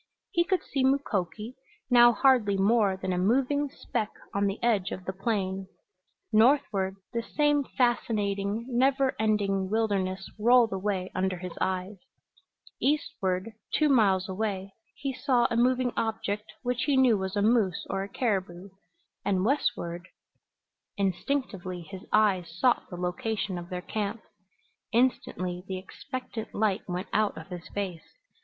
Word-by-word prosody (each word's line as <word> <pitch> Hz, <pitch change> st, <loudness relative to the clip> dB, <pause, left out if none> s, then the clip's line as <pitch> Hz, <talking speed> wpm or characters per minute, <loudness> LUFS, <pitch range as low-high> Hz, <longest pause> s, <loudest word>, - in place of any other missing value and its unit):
He 345 Hz, -, +3 dB
could 375 Hz, +1 st, 0 dB
see 270 Hz, -2 st, -1 dB
Mukoki, 230 Hz, -5 st, 0 dB, 0.4 s
now 240 Hz, -1 st, +8 dB
hardly 235 Hz, -5 st, +3 dB
more 200 Hz, -1 st, +3 dB
than 190 Hz, -1 st, -2 dB
a 180 Hz, -, 0 dB
moving 270 Hz, +8 st, +2 dB
speck 215 Hz, -4 st, -3 dB, 0.2 s
on 200 Hz, 0 st, +1 dB
the 195 Hz, -, -2 dB
edge 210 Hz, -5 st, +2 dB
of 185 Hz, -, -6 dB
the 190 Hz, -, -3 dB
plain; 195 Hz, -2 st, -2 dB, 0.7 s
northward 215 Hz, -5 st, +3 dB, 0.2 s
the 235 Hz, -, 0 dB
same 295 Hz, +3 st, +2 dB
fascinating, 215 Hz, -4 st, 0 dB
never 265 Hz, +2 st, +2 dB
ending 200 Hz, -3 st, +1 dB
wilderness 195 Hz, -3 st, 0 dB
rolled 235 Hz, 0 st, +5 dB
away 190 Hz, -1 st, -2 dB
under 185 Hz, 0 st, 0 dB
his 180 Hz, 0 st, -7 dB
eyes; 185 Hz, +2 st, -1 dB, 0.8 s
eastward, 210 Hz, -9 st, 0 dB, 0.2 s
two 305 Hz, -1 st, +3 dB
miles 195 Hz, -8 st, +4 dB
away, 195 Hz, -1 st, -3 dB, 0.2 s
he 275 Hz, -1 st, -3 dB
saw 255 Hz, -2 st, +2 dB
a -, -, +1 dB
moving 250 Hz, +1 st, +2 dB
object 220 Hz, -2 st, -2 dB
which 245 Hz, -1 st, -1 dB
he 285 Hz, -2 st, +2 dB
knew 255 Hz, -4 st, +5 dB
was 190 Hz, 0 st, -3 dB
a 205 Hz, -, +2 dB
moose 215 Hz, -5 st, +2 dB
or 195 Hz, -, -2 dB
a 195 Hz, -, -5 dB
caribou; 195 Hz, -4 st, -2 dB, 0.5 s
and 190 Hz, -1 st, +1 dB
westward 175 Hz, -, -1 dB, 0.9 s
Instinctively 195 Hz, -2 st, -2 dB
his 190 Hz, +2 st, -9 dB
eyes 190 Hz, -6 st, +3 dB
sought 250 Hz, -2 st, +2 dB
the 175 Hz, -, -7 dB
location 185 Hz, +3 st, -2 dB
of 175 Hz, +1 st, -9 dB
their 180 Hz, -1 st, -4 dB
camp. 215 Hz, +2 st, -3 dB, 0.7 s
Instantly 185 Hz, -7 st, 0 dB
the 190 Hz, -, -3 dB
expectant 235 Hz, +4 st, -7 dB
light 205 Hz, -2 st, +1 dB
went 180 Hz, +3 st, -3 dB
out 215 Hz, 0 st, +1 dB
of -, -, -9 dB
his 180 Hz, -2 st, -8 dB
face. 190 Hz, -5 st, -5 dB
205 Hz, 140 wpm, -28 LUFS, 190-240 Hz, 0.9 s, now